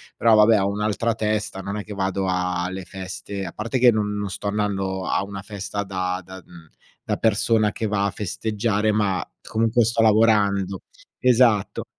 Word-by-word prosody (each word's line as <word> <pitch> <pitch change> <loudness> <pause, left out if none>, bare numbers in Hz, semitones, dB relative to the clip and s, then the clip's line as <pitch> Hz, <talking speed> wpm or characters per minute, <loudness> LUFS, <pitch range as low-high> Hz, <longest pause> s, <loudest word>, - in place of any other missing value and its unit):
però 115 -2 +4
vabbè 105 0 +5
ho 95 - +1
un'altra 105 +3 -1
testa, 105 -2 -2
non 100 +2 -4
è 105 - -4
che 105 - -7
vado 95 0 -1
a 90 -1 -1
le 95 0 -6
feste 95 +1 -7
a 85 - -7
parte 115 +4 -2
che 125 -1 +7
n - - -2 0.2
non 100 -1 -3
sto 100 - -5
andando 95 -2 -1
a - - +1
una 100 0 -7
festa 100 0 -5
da 95 -1 -2
da 95 +2 -11
uhm, 85 -3 -15 0.4
da - - 0
persona 110 0 +2
che 110 - -3
va 100 -1 0
a 100 - 0
festeggiare, 105 +2 -1
ma 105 -3 0 0.2
comunque 115 +1 +1
sto 115 +1 +1
lavorando. 105 -4 +3 0.4
Esatto. 120 -5 +3
100 Hz, 180 wpm, -23 LUFS, 95-110 Hz, 0.4 s, che